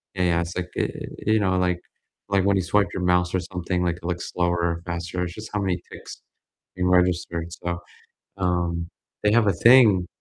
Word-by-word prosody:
yeah, 90 - 0
yeah, 85 -1 +2
it's 85 +1 -5
like, 90 0 -3
e - - +2
e - - 0 0.4
eh, 110 - +4
you 110 - +4
know, 95 -2 +1
like 90 -1 -1 0.5
like 95 -1 +4
when 100 -1 +3
you 95 - 0
swipe 100 +3 +2
your 90 - -2
mouse 90 0 +1
or - - +2
something, 90 0 -2
like 85 -1 0
it 90 - -18
looks 90 0 -3
slower 85 -1 0 0.2
or 85 - -13
faster, 90 +1 -3
it's 85 - -4
just 110 +1 -9
how 105 - 0
many 95 -3 0
ticks - - -10 0.5
being 90 0 0
registered, 90 -2 +1
so, 85 0 -4 0.6
um, 85 -2 -1 0.4
they 105 - +4
have 115 -2 +4
a 100 - +4
thing 110 -8 +7
90 Hz, 220 wpm, -24 LUFS, 85-95 Hz, 0.6 s, thing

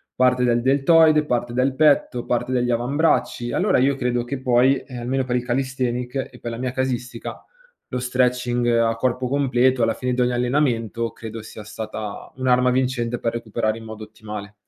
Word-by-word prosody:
parte 125 0 +3
del 120 -1 +2
deltoide, 150 +3 +4
parte 120 -3 -1
del 130 +2 +1
petto, 140 -4 +2
parte 125 +1 -1
degli 125 -1 +1
avambracci. 120 0 0
Allora - - +2
io 135 +2 +3
credo 125 -2 -1
che 130 +2 -5
poi, 130 +1 +4
ehm, 130 -2 -9
almeno 130 +2 -1
per 125 -1 -1
il 125 - -1
calisthenics 125 -1 -2 0.2
e 125 - -14
per 120 - -5
la 115 - -5
mia 125 +1 -2
casistica, 130 -1 -4 0.5
lo 125 - -3
stretching 125 -1 0
a 115 -1 +2
corpo 125 +2 -1
completo 130 -2 +2
alla 115 0 +2
fine 125 +2 -2
di - - -3
ogni 125 0 +1
allenamento 120 -3 0
credo 115 0 -8
sia 110 0 -10
stata 105 -1 -7
un'arma 125 -1 +2
vincente 125 -2 0
per 115 - -1
recuperare 115 -1 -2
in 115 - -10
modo 110 0 -9
ottimale. 105 -1 -9
125 Hz, 180 wpm, -22 LUFS, 120-130 Hz, 0.5 s, deltoide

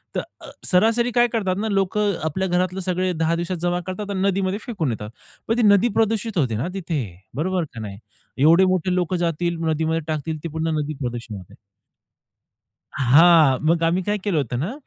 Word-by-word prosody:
तर - - 0 0.2
अ, - - -10 0.2
सरासरी 230 +6 +2
काय 240 0 +4
करतात 195 -5 0
ना 220 - -1
लोकं 200 +1 +1
आपल्या 190 +5 -1
घरातलं 180 +1 0
सगळं 185 -1 -1
10 165 +1 +1
दिवसात 170 +1 -3
जमा 175 0 0
करतात 205 +2 -5
आणि 190 -1 -2
नदीमध्ये 195 +1 -1
फेकून 180 - -2
येतात. 105 -2 -6 0.4
पण 225 +2 +1
ती - - +2
नदी 205 +2 +5
प्रदूषित 225 -2 0
होते 125 -8 +1
ना 130 - -2
तिथे 165 -6 -2 0.3
बरोबर 180 +4 -1
का 115 - -8
नाही? 100 -2 -7 0.4
एवढे 165 +7 +5
मोठे 185 -1 +1
लोकं 180 0 0
जातील 170 0 -1
नदीमध्ये 160 +1 0
टाकतील 155 0 -3
ते 165 - -4
पुन्हा 160 +1 -2
नदी 150 0 -2
प्रदूषित 120 -3 -5
होते. 90 - -13 1.4
हां. 145 +1 +5
मग 165 0 +2
आम्ही 170 +3 +2
काय 210 +3 -1
केलं 195 -6 0
होतं 125 -4 -2
ना, 175 - -2
175 Hz, 185 wpm, -22 LUFS, 155-190 Hz, 1.4 s, नदी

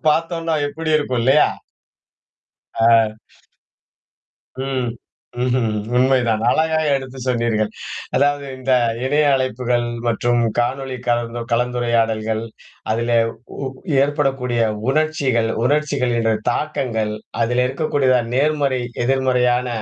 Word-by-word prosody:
பார்த்தோன்னா 165 +1 0
எப்பிடி 155 +2 -4
இருக்கும்? 130 -5 -1
இல்லயா! 135 +5 +4 1.3
ஆ, 115 - +3 1.8
ம். 130 -3 -1 0.5
ம்ஹ்ம். 125 -2 +1 0.3
உண்மைதான். 125 -4 +2
அழகா 160 +4 +2
எடுத்துச் 130 -1 -4
சொன்னீர்கள். 115 -3 +1 0.5
அதாவது, 145 +1 +2
இந்த 130 0 -3 0.3
இணைய 145 +2 +2
அழைப்புகள் 125 -2 0 0.2
மற்றும் 120 +1 +1 0.2
காணொளி 130 +2 -1
கலந் 120 0 0
கலந்துரையாடல்கள், 115 -2 0 0.5
அதிலே 115 +1 0 0.5
ஊ 130 - -3 0.3
ஏற்படக்கூடிய 135 -4 0 0.3
உணர்ச்சிகள், 140 -6 +1 0.2
உணர்ச்சிகள் 145 -2 +1
என்ற 115 -1 +2 0.2
தாக்கங்கள், 115 -6 -2 0.3
அதிலே 125 +2 +2
இருக்கக்கூடிய 135 -3 +1
நேர்மறை, 140 -2 +1 0.2
எதிர்மறையான 125 -1 +2
130 Hz, 90 wpm, -20 LUFS, 120-140 Hz, 1.8 s, இல்லயா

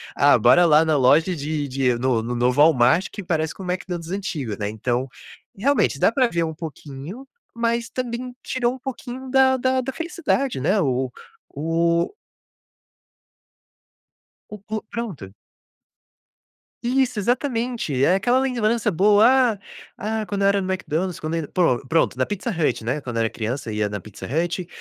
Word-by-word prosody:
"Ah, - - +5
bora 175 0 +5
lá 155 0 +5
na 155 -1 +2
loja 150 +7 +4
de 145 0 -3
de 130 -2 0
no 125 -2 +1
no 120 +2 -4
novo 125 +4 +2
Walmart 155 +3 +4
que 200 - -7
parece 160 -2 -1
com 190 - -10
o - - -7
McDonald's 175 -2 -5
antigo", 150 - -3
né, 105 -1 -2
então, 120 +4 -2 0.5
realmente 250 - +1
dá - - +4
para 255 0 +3
ver 170 -6 -1
um 160 -1 -3
pouquinho, 160 - -8 0.3
mas 235 0 -1
também 250 0 -4
tirou 245 -1 0
um - - -13
pouquinho 260 0 -7
da 265 -1 +4
da 260 +1 +1
da 265 +2 -4
felicidade 315 - -1
né, 195 +8 +2
o 130 -4 0 0.5
o 170 - +1 2.4
o 210 - -7
plu 215 +1 -4
pronto. 165 - -6 1.5
Isso, 255 0 +1
exatamente. 235 - -1
É 180 - +4
aquela 245 +6 +2
lembrança 235 -4 +1
boa: 205 +5 +5 0.3
"Ah - - -17 0.6
ah, - - -4
quando 200 -1 -3
eu - - +5
era 200 0 +2
no 185 - -4
Mcdonald's, 185 -1 -2
quando 155 +1 -3
ainda" 160 -3 -3
Pro 135 -8 +2
pronto, 160 -4 +1
na 130 - +1
Pizza 205 +4 -4
Hut, 155 - 0
né, 125 +6 -2
quando 120 -3 -6
eu 115 - +2
era 115 - +1
criança 115 +1 -4
ia 105 -1 -1
na 105 0 -4
Pizza 105 +1 -10
Hut, 175 +5 -1
170 Hz, 165 wpm, -22 LUFS, -, 2.4 s, Ah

